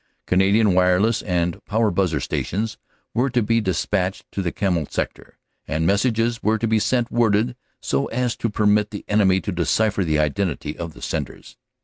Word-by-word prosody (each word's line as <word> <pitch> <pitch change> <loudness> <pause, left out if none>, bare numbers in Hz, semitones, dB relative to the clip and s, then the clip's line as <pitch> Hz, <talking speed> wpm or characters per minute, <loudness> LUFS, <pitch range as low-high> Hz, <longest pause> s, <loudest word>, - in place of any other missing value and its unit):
Canadian 100 +2 +3
Wireless 90 +5 +3
and 90 -3 -1
Power 110 0 +1
Buzzer 90 -4 +1
Sections 110 - -3 0.3
were 125 +4 +1
to 125 -2 +1
be 115 +2 +2
despatched 95 +2 -1
to 100 - -3
the 90 -3 -1
Kemmel 90 -7 -1
Sector, - - -5 0.3
and 80 +1 -1
messages 115 +4 +1
were 110 +1 +2
to 115 - -2
be 110 0 +2
sent 120 +1 0
worded 115 +1 +2 0.3
so 70 0 0
as 125 0 -1
to 115 - -1
permit 105 0 +2
the 105 - -8
enemy 95 -3 +3
to 100 - -3
decipher 100 +4 +1
the 80 -3 +1
identity 75 0 -1
of 85 -2 -7
the - - -12
senders. - - -5
105 Hz, 170 wpm, -22 LUFS, 90-110 Hz, 0.3 s, Canadian